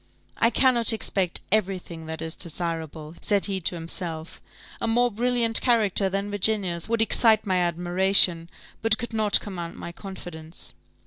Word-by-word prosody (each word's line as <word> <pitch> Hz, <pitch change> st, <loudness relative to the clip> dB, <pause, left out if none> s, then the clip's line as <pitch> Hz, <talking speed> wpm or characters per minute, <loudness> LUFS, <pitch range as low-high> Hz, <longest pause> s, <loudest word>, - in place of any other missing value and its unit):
"I 230 Hz, -, +4 dB
cannot 240 Hz, -1 st, +3 dB
expect 190 Hz, -5 st, 0 dB
every 195 Hz, -2 st, +2 dB
thing 165 Hz, -3 st, -11 dB
that 160 Hz, 0 st, -6 dB
is 160 Hz, 0 st, -4 dB
desirable," 160 Hz, -2 st, -5 dB
said 205 Hz, -2 st, +1 dB
he 195 Hz, -2 st, -3 dB
to 175 Hz, +1 st, -2 dB
himself: 165 Hz, -1 st, -4 dB, 0.4 s
"a -, -, -1 dB
more 240 Hz, +2 st, +2 dB
brilliant 235 Hz, +1 st, +2 dB
character 210 Hz, -5 st, +3 dB
than 195 Hz, +2 st, -3 dB
Virginia's 200 Hz, -3 st, -1 dB
would 230 Hz, -1 st, +2 dB
excite 225 Hz, -1 st, +4 dB
my 190 Hz, -2 st, 0 dB
admiration, 175 Hz, 0 st, +2 dB, 0.3 s
but 225 Hz, 0 st, +3 dB
could 235 Hz, 0 st, -6 dB
not 215 Hz, -2 st, +2 dB
command 175 Hz, -4 st, -7 dB
my 170 Hz, -, -8 dB
confidence." 170 Hz, -3 st, -9 dB
190 Hz, 150 wpm, -24 LUFS, 170-220 Hz, 0.4 s, I